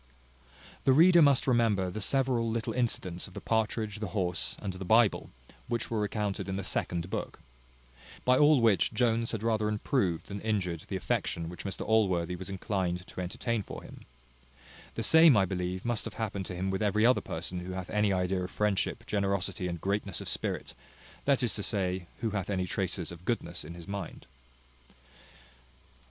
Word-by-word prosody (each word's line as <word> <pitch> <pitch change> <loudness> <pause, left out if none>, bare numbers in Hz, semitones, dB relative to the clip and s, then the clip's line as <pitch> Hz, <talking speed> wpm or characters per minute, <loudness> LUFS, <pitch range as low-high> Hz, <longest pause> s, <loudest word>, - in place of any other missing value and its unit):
The 135 - +5
reader 170 +4 +7
must 140 -3 +5
remember 110 -7 +2
the 110 - -5
several 125 -1 +1
little 115 0 -2
incidents 110 -8 -1
of 95 - -16
the - - -4
partridge, 110 -1 -1
the 105 - -3
horse, 90 -1 -1
and 100 -3 -4
the 95 +1 -6
Bible, 110 +3 +3 0.4
which 120 -1 -2
were 115 - 0
recounted 105 -2 -2
in 95 - -2
the 100 - -3
second 90 -1 -2
book. - - -4 0.9
By 125 - +5
all 150 -3 +6
which 110 -1 +3
Jones 115 -1 +1
had 110 -2 -4
rather 110 -2 +1
improved 105 - 0
than 100 0 -6
injured 90 -7 -1
the 95 - -4
affection 85 -2 -1
which 90 - -9
Mr 95 - -4
Allworthy 95 -6 +2
was 95 +2 -7
inclined 95 -2 -2
to 95 - -7
entertain 115 +4 -2
for - - -8
him. - - -12 0.9
The - - -2
same, 160 -6 +7
I 95 - +4
believe, 90 +1 -3
must 120 -2 -1
have - - -6
happened 100 -4 -3
to 90 - -5
him 95 +2 -1
with 95 - -2
every 105 +1 +2
other 125 +1 +5
person 90 +2 -4
who 90 +1 -6
hath 95 -1 -5
any 105 -1 +2
idea 90 0 0
of 90 - -4
friendship, 105 0 0
generosity, 100 -1 -1
and 85 -1 -4
greatness 100 0 -1
of - - -6
spirit, - - -2 0.5
that 135 -2 +3
is 120 - +1
to 105 - -3
say, 95 -4 -1
who 115 -2 0
hath 100 -2 -3
any 95 -2 0
traces 90 -2 -2
of 85 0 -10
goodness 90 -5 -2
in 85 +3 -9
his 85 -1 -10
mind. 100 -4 -6
100 Hz, 185 wpm, -30 LUFS, 90-115 Hz, 0.9 s, reader